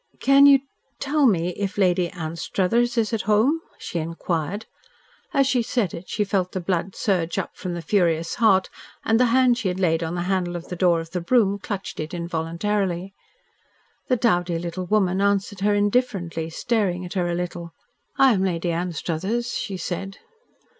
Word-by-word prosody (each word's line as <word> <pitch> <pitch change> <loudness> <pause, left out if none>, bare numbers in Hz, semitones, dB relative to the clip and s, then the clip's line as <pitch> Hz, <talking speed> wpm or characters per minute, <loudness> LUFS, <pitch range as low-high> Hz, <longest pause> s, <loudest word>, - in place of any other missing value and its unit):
"Can 275 +1 +6
you 275 -1 +7 0.4
tell 285 0 +2
me 175 -5 +2
if 195 +2 -4
Lady 180 -3 +2
Anstruthers 190 +7 -1
is 225 -1 +1
at 220 - 0
home?" 235 +10 +3 0.2
she 170 - -4
inquired. 165 +4 -3 0.7
As 275 -4 +3
she 255 -2 +2
said 225 -5 -1
it 170 - -8
she 210 - 0
felt 190 -2 -1
the 185 - -2
blood 180 +1 -2
surge 175 -5 0
up - - -3
from 180 -2 -5
the 170 - -6
furious 165 -2 +1
heart, 190 -4 +4 0.3
and 225 +1 +3
the 250 - +5
hand 250 0 +3
she 215 - -2
had 180 0 -2
laid 165 -3 +2
on 165 +1 -3
the 175 - -2
handle 180 -1 -1
of 175 - -7
the 180 - -4
door 175 -2 +3
of 165 0 -11
the 180 - -2
brougham 200 0 +2
clutched 195 0 -5
it 155 +3 -4
involuntarily. 175 +3 -2 0.9
The 255 - +2
dowdy 175 -7 +1
little 175 +2 -5
woman 190 -2 +2
answered 200 -1 0
her 205 +1 +2
indifferently, 205 -7 0
staring 185 -2 -1
at 175 - -7
her 180 -3 0
a 170 - -1
little. 175 -1 -5 0.5
"I 265 -2 +6
am 190 -2 +1
Lady 175 -2 -1
Anstruthers," 180 +7 -2
she 195 -3 -3
said. 190 +2 -5
185 Hz, 180 wpm, -23 LUFS, 175-215 Hz, 0.9 s, you